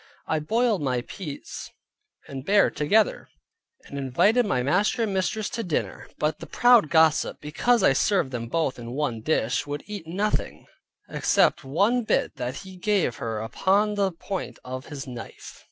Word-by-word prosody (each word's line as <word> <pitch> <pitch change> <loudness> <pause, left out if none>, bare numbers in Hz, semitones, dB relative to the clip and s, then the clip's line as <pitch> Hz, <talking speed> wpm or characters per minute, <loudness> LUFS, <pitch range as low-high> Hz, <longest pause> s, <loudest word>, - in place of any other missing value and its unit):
I 160 - 0
boiled 220 +5 +1
my 130 -3 0
peas 150 +2 -8 0.6
and 135 -2 -7
bear 200 +6 +4
together, 205 +9 +1 0.6
and 140 - -7
invited 205 - +2
my 125 -9 0
master 200 - +1
and 210 -3 -1
mistress 195 +3 -1
to 230 - -3
dinner; 175 -6 -3
but 150 0 -1
the - - -9
proud 240 -9 +5
gossip, 160 -2 +3
because 225 +11 +1
I - - +5
served 170 -1 +1
them 120 -2 -4
both 145 -1 -1
in 120 0 -7
one 130 -6 -2
dish, 125 -1 0
would 145 0 -4
eat 205 -6 -7
nothing, 200 +5 -2 0.4
except - - +2
one 200 - +2
bit 215 - 0
that 125 0 -3
he 190 -1 -11
gave 185 - 0
her 110 -2 -3
upon 195 - +1
the 200 -2 +1
point 190 +3 -5
of 130 +1 -6
his 145 -2 -7
knife. 120 -3 -9
160 Hz, 165 wpm, -25 LUFS, 135-205 Hz, 0.6 s, proud